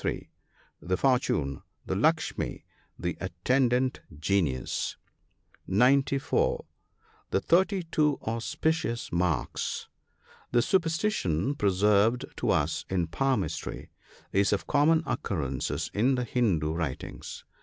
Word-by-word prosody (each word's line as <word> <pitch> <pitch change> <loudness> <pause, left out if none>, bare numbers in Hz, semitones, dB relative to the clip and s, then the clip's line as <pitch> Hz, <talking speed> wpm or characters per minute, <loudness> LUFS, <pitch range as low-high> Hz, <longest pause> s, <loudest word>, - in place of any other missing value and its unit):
The 90 +1 -1
fortune. 80 - +1
— - - -44
The - - -2
"Lukshmi," - - 0 0.3
the 90 0 -2
attendant 125 +8 +1 0.2
genius. 80 -7 0 0.7
(94 135 +6 +2 0.3
) - - -34
The - - +2
thirty 190 - +2
two 150 -3 +1
auspicious 115 +3 -1
marks. 85 -6 -1 0.3
— - - -28
This 120 0 +4
superstition, 165 - +1
preserved 105 +1 +3
to - - -1
us 75 +2 +1
in 90 -3 0
palmistry, 130 0 -2 0.4
is 100 0 +3
of 100 - 0
common 155 +3 +3
occurrence 75 - -2 0.2
in 125 +6 +3
the 125 - -1
Hindoo 95 -11 +1
writings. 80 -6 -5
110 Hz, 105 wpm, -28 LUFS, 90-135 Hz, 0.7 s, This